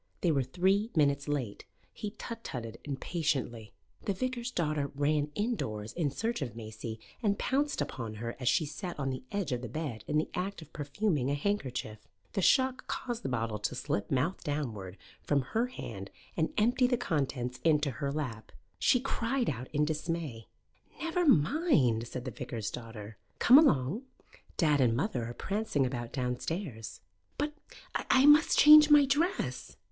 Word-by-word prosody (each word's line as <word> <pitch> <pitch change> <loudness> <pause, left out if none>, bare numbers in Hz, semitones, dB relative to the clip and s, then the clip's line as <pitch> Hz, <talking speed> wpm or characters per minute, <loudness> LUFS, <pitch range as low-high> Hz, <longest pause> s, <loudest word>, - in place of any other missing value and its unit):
They 175 - +3
were 140 -3 +2
three 190 - +1
minutes 140 -2 +2
late, 135 -8 -2 0.3
He 210 0 -6
tut 230 0 -7
tutted 115 -3 -6
impatiently. 135 - -2 0.3
The 200 - +1
vicar's 250 +2 -2
daughter 155 - -1
ran 145 +1 +1
indoors 110 - -2
in 160 -5 0
search 225 - -2
of 120 -4 -4
Maisie 110 0 -7 0.2
and 205 -3 +1
pounced 285 +2 0
upon 115 -4 -4
her 115 +2 -5
as 125 - +1
she 160 - +2
sat 175 +4 -6
on 135 -1 -1
the 130 - -5
edge 195 -8 -2
of 125 -1 -1
the 125 - -6
bed 125 -5 -4
in 150 - +1
the 155 - +1
act 185 -1 -3
of 155 - -19
perfuming 145 -1 -1
a 145 - +1
handkerchief. 135 - -2 0.3
The 195 - 0
shock 260 +5 +3
caused 240 -2 -3
the 135 - -3
bottle 115 -3 -2
to 105 - -2
slip 100 - -2
mouth 140 +8 0
downward 110 -11 -4 0.2
from 140 -2 +1
her 225 - 0
hand 100 - -7 0.3
and 160 -1 0
empty 245 +4 +3
the 245 -1 +1
contents 135 - -2
into 150 -3 +3
her 140 +4 -3
lap. 130 -7 -4 0.3
She 250 - +4
cried 250 -1 -1
out 125 +3 -6
in 150 0 +2
dismay. 155 -6 -3 0.5
"Never 330 +1 0
mind," 150 - +3
said 125 +1 -6
the 130 - -3
vicar's 110 -1 -5
daughter. 115 -3 -8 0.2
"Come 260 +4 +8
along. 185 - +2 0.5
Dad 150 -4 +3
and 115 -3 +3
mother 130 - -1
are 120 - -7
prancing 195 -9 0
about 120 -2 -4
downstairs." 125 - -4 0.4
"But 295 +1 -1 0.4
I 265 +1 +3
must 295 +2 +6
change 300 0 +9
my 295 -1 +8
dress!" 325 +8 -1
150 Hz, 165 wpm, -31 LUFS, -, 0.5 s, change